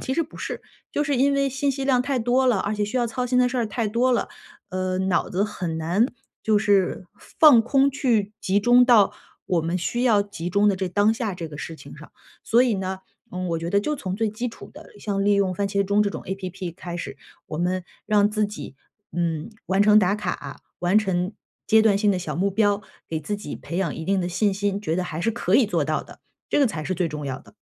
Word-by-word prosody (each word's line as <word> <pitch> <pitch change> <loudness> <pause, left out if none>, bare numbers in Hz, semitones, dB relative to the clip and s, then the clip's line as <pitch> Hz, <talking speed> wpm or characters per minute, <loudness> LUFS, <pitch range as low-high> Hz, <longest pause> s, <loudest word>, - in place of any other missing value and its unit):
其 265 - -3
实 330 +5 +1
不 320 - -12
是， - - -5 0.3
就 295 - +1
是 285 -2 0
因 275 +3 +3
为 275 0 +2
信 275 +2 0
息 270 0 -4
量 255 -3 +3
太 270 0 -1
多 245 +3 +2
了， 245 -5 +3
而 200 - -1
且 210 0 0
需 210 +5 -2
要 240 - +1
操 250 +2 -3
心 250 0 +1
的 250 0 +4
事 250 - -4
儿 235 -2 +1
太 215 +1 -2
多 240 +4 +2
了， 240 - 0 0.4
呃， 185 0 -2
脑 190 -2 0
子 190 +2 0
很 180 -6 -3
难 175 +8 +2 0.4
就 215 -1 +3
是 200 -3 +1 0.3
放 290 -8 +8
空 270 +4 +3
去 235 -7 0
集 195 +2 +2
中 245 +3 +6
到 230 -5 +5 0.3
我 175 -2 +1
们 165 +3 -1
需 240 +7 -2
要 225 -5 +4
集 180 -4 -6
中 200 +3 +3
的 200 - +2
这 190 -1 -2
当 205 +4 +3
下 220 -4 -3
这 170 -2 -6
个 150 - -9
事 165 +2 -6
情 - - -12
上。 - - -13 0.3
所 235 +2 +4
以 245 -3 +2
呢， 190 -1 -3 0.3
嗯， 180 0 -4
我 165 -1 -1
觉 165 +1 -4
得 200 - +3
就 300 +8 -2
从 190 -8 -4
最 220 +2 0
基 215 +4 -4
础 230 - -12
的， - - -13
像 200 -2 -1
利 205 - +4
用 200 -2 +2
番 200 +2 -1
茄 200 0 +1
钟 200 +2 +2
这 205 - 0
种 - - -6
app 185 -2 -5
开 175 -1 -7
始， 175 - -6 0.3
我 155 - -5
们 180 +2 0 0.2
让 210 -1 +3
自 210 0 +1
己， 205 -9 -9 0.4
嗯， 165 +2 -2 0.2
完 190 +1 +3
成 210 0 +6
打 195 -1 +3
卡， 175 -9 -5 0.2
完 180 +4 +4
成 190 -2 -1 0.3
阶 220 - +5
段 220 -2 +4
性 205 0 +2
的 185 - -1
小 180 - -4
目 195 +3 +1
标， 205 0 +1 0.3
给 160 - -2
自 155 +7 -3
己 205 - -7
培 170 - -5
养 190 -5 -1
一 160 - -6
定 195 +2 +1
的 175 - -2
信 200 +3 +1
心， 200 0 -1
觉 160 -6 -2
得 185 - 0
还 165 -3 -5
是 225 - +1
可 215 -4 -1
以 260 - +6
做 175 -7 0
到 155 +1 -1
的， - - -15 0.3
这 - - +2
个 280 - +5
才 165 -9 -4
是 185 - -2
最 175 -1 0
重 150 -1 -6
要 130 -2 -4
的。 - - -19
200 Hz, 275 characters per minute, -24 LUFS, 180-230 Hz, 0.4 s, 放